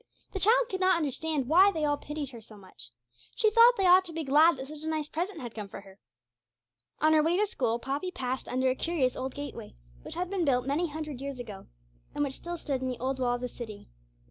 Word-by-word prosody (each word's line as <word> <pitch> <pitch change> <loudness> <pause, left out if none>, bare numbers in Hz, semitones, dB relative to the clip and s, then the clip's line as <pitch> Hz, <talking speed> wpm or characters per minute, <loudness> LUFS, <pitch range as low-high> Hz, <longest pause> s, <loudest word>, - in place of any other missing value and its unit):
The 390 - -4
child 475 +6 +5
could 380 -5 -4
not 370 -1 +4
understand 305 -1 -1
why 370 +7 +6
they 315 -5 -1
all 290 0 +2
pitied 295 -1 -6
her 235 -3 -10
so 215 -1 -14
much. 185 - -14 0.5
She 435 -1 +3
thought 470 +2 +7
they 390 - +1
ought 365 +1 +7
to 345 - -5
be 325 0 -3
glad 300 +3 +5
that 265 +1 -7
such 300 +1 -9
a 315 - -5
nice 310 -2 -2
present 345 +4 -4
had 240 -2 -7
come 210 -2 -6
for 195 - -9
her. 195 0 -17 1.0
On 310 +1 +5
her 310 - +5
way 330 +3 +2
to 420 - +3
school 240 - -1
Poppy 275 +9 -3
passed 260 -6 -4
under 260 +1 +1
a - - +1
curious 270 -3 0
old 260 0 -4
gateway, 285 - -7 0.3
which - - -7
had 360 - -2
been 385 -3 0
built 250 -4 +2
many 295 +6 0
hundred 300 -3 -6
years 275 -2 -5
ago, 210 -5 -8 0.5
and 290 - +1
which 275 -2 -2
still 345 +5 -6
stood 275 -5 -3
in 260 - -2
the 250 -1 -3
old 260 +1 -2
wall 245 -1 +1
of 245 - -6
the 250 - -2
city. 225 - -9
290 Hz, 245 wpm, -29 LUFS, 255-340 Hz, 1.0 s, thought